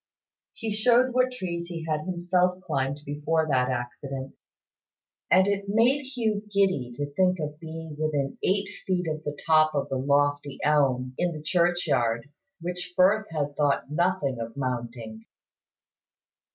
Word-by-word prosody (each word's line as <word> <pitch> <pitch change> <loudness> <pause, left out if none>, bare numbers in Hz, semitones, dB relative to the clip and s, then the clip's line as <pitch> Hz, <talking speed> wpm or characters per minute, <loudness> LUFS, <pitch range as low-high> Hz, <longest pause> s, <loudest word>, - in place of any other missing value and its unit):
He 225 -2 -4
showed 240 +4 +4
what 255 0 +3
trees 170 -7 -4
he 165 -2 -6
had 155 -1 -1
himself 180 0 +1
climbed 140 -4 -1
before 155 +2 0
that 130 -1 +2
accident; 130 +2 -4 0.9
and 185 +2 +6
it 200 0 0
made 235 +7 +3
Hugh 225 -6 -1
giddy 185 -11 +2
to 145 0 -4
think 185 +3 +3
of 150 -1 -4
being 160 -1 -7
within 145 -3 -1
eight 195 +1 +1 0.2
feet 180 -2 0
of 155 0 -3
the 145 -1 -4
top 155 -1 +4
of 140 - -1
the 135 - -1
lofty 145 +1 +1
elm 130 -4 +2
in 175 -1 +1
the 155 -1 -8
churchyard, 155 -8 +1 0.3
which 180 +1 -4
Firth 205 +4 +4
had 145 -3 -2
thought 145 -1 +1
nothing 170 -6 0
of 115 +3 -6
mounting. 120 -4 -4
155 Hz, 145 wpm, -26 LUFS, 140-185 Hz, 0.9 s, and